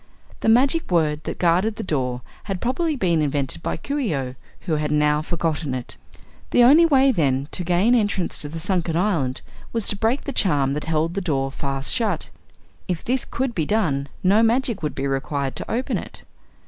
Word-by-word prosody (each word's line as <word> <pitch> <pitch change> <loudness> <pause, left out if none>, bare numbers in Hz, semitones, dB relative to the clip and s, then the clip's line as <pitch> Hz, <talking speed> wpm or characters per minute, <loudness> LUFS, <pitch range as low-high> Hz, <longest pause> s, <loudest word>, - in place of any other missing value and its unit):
The - - +1
magic 270 +8 +3
word 155 -3 +1
that - - -4
guarded 180 +5 +2
the - - -5
door 125 -7 -2 0.2
had 195 -3 -3
probably 305 - 0
been 175 - +1
invented 145 0 -1
by - - -2
Coo 280 - -3
ee 220 - 0
oh, 130 -2 -3 0.3
who 160 -4 -1
had 150 0 -1
now 150 0 +2
forgotten 160 -4 -2
it. 125 -1 -7 0.5
The 245 - +5
only 305 +7 +7
way, 270 -3 +5
then, 140 - +1
to 180 - -3
gain 180 +7 +3
entrance 205 -6 +1
to 145 - -4
the 165 +2 -6
sunken 175 -2 0
island 165 -10 0 0.3
was 230 -3 0
to - - 0
break 225 +7 0
the 280 - -4
charm 145 - +2
that 150 - -3
held 160 +1 0
the 200 - -2
door 135 -6 -1
fast 135 0 -2
shut. 230 -4 -1 0.6
If 175 -3 -2
this 255 +1 0
could 260 -1 -2
be 160 -7 -1
done 145 -11 0
no 200 +4 +5
magic 235 -2 +1
would 150 - -3
be 135 - -2
required 135 0 -2
to - - -4
open 245 +3 -1
it. - - -10
170 Hz, 200 wpm, -22 LUFS, 145-225 Hz, 0.6 s, only